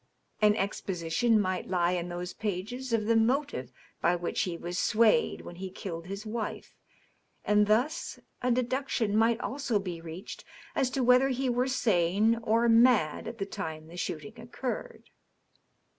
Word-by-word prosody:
An 210 0 +5
exposition 195 +2 0
might 185 -2 -1
lie 175 -1 +2
in 175 -1 -2
those 175 +1 -5
pages 220 +6 -4
of 225 -2 +1
the 230 +1 +3
motive 225 - +1 0.3
by 175 +1 +3
which 175 0 -2
he 175 -2 -2
was 175 +1 -4
swayed 230 - +3
when 175 - -10
he 190 +1 -5
killed 175 -2 -7
his 200 +3 -6
wife, 220 0 -5 0.7
and 210 0 +4
thus 245 +10 +1 0.2
a 250 - 0
deduction 245 -3 0
might 225 +1 +3
also 265 -4 -1
be 180 -4 -5
reached 165 +4 -8 0.3
as 265 - +1
to 260 0 -1
whether 250 +2 +5
he 260 0 -1
were 245 +1 +1
s^e 220 -2 +2
or 230 +1 +2
mad 230 -9 +4
at 230 0 -6
the 195 - -2
time 160 -4 -6
the 170 - -11
shooting 180 +5 -5
occurred. 240 +2 -6
215 Hz, 160 wpm, -29 LUFS, 180-240 Hz, 0.7 s, An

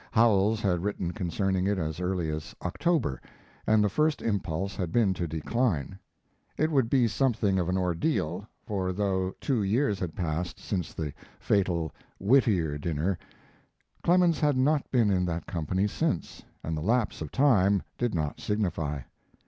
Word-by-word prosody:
Howells 110 -2 +3
had 90 -4 +1
written 95 -4 -2
concerning 95 -1 0
it 100 0 +1
as 80 -2 -3
early 90 -3 -1
as 75 0 -6
October, 160 - 0 0.5
and 110 -1 +5
the - - +3
first 150 +9 +1
impulse 95 -3 -1
had 90 -4 -3
been 105 -3 +3
to 90 -2 -3
decline. 90 - -1 0.6
It 155 +1 +1
would 135 -6 +2
be 125 -3 +4
something 110 -6 +1
of 90 -1 -1
an 90 - +1
ordeal; 90 - -1 0.2
for 95 -3 -1
though 95 -1 -1
two 130 -6 0
years 105 +2 +1
had 85 -4 -4
passed 85 0 -3
since 90 -5 -3
the 75 -3 -4 0.3
fatal 85 -6 +1 0.3
Whittier 95 - +3
dinner, 85 +4 -1 0.8
Clemens 175 -1 +3
had 145 -3 +2
not 145 +2 +2
been 115 -5 +3
in 90 -2 +2
that 85 -2 -3
company 90 +3 -1
since, 105 - -2 0.2
and 80 - -2
the 75 - -3
lapse 110 +3 0
of 75 - -5
time 100 -9 +4 0.2
did 120 -5 0
not 75 -2 -2
signify. 85 -9 -1
95 Hz, 155 wpm, -28 LUFS, 85-115 Hz, 0.8 s, and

